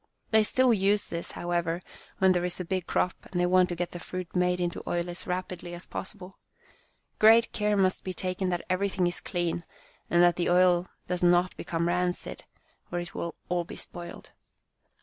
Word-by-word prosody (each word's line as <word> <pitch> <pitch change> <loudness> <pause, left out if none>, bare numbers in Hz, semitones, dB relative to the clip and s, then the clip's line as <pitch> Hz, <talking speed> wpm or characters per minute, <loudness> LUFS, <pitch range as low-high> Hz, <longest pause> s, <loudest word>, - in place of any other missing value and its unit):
They 220 -1 +6
still 255 +3 +3
use 200 0 +2
this, 170 - -5
however, 175 -1 -1 0.4
when 190 -1 +5
there 175 -1 +1
is 180 0 -3
a 180 - -3
big 185 0 -2
crop, 180 - +1 0.2
and 175 - -1
they 180 - +3
want 180 0 +4
to 175 - -2
get 175 0 -3
the 175 - -7
fruit 180 0 -6
made 180 0 +2
into 175 -1 -2
oil 175 0 0
as 175 - -7
rapidly 180 -1 -4
as 175 - -3
possible. 195 -1 -7 0.8
Great 225 +2 +6
care 210 -1 +1
must 185 -1 +2
be 185 - -3
taken 185 0 -1
that 175 -1 -2
everything 185 0 +1
is 175 - -1
clean 175 -2 -2 0.5
and 175 0 +5
that 175 0 +4
the 175 - +1
oil 180 0 +4 0.2
does 180 -1 -2
not 175 +1 +4
become 170 0 -2
rancid, 180 0 -2 0.5
or 175 - -1
it 175 0 -6
will 170 - -4
all 175 0 0
be 170 - -9
spoiled." 175 -1 -9
180 Hz, 190 wpm, -28 LUFS, 175-185 Hz, 0.8 s, They